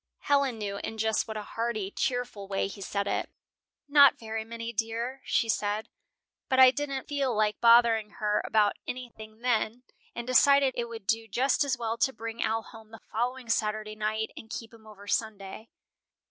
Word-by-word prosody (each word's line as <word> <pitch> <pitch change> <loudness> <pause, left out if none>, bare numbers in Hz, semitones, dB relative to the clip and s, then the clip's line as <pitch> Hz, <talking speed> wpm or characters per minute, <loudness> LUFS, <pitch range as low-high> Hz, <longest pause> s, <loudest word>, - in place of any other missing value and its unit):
'" - - -60
Helen 280 -4 +3
knew 200 -2 -4
in 225 - -5
just 220 +1 0
what 220 -1 -5
a 210 - -4
hearty, 220 -3 -3
cheerful 245 -6 -2
way 195 0 -1
he 200 +1 -7
said 200 +1 -2
it. - - -2 0.6
"'Not 285 0 +7
very 220 -3 -4
many, 230 +1 -6
dear,' 230 +4 -3
she 230 - +1
said; 210 0 -1 0.6
but 260 -1 +2
I 260 -1 +9
didn't 275 -1 -4
feel 275 -4 -1
like 210 0 +1
bothering 230 -2 +5
her 210 -2 +1
about 210 -2 +2
anything 225 -3 -8
then, 240 0 0 0.3
and 235 - -4
decided 275 +2 +5
it 235 -1 -3
would 225 -3 -8
do 225 +2 0
just 255 +8 +2
as 270 -2 -1
well 230 -1 -2
to 270 - +3
bring 230 -1 -6
Al 225 0 0
home 220 -2 -14
the 225 0 -12
following 245 +3 -2
Saturday 215 -1 -1
night 215 +1 -2
and 225 - -11
keep 230 0 -7
him 220 -1 -16
over 205 -1 -13
Sunday." 210 0 -3
225 Hz, 185 wpm, -28 LUFS, 215-245 Hz, 0.6 s, I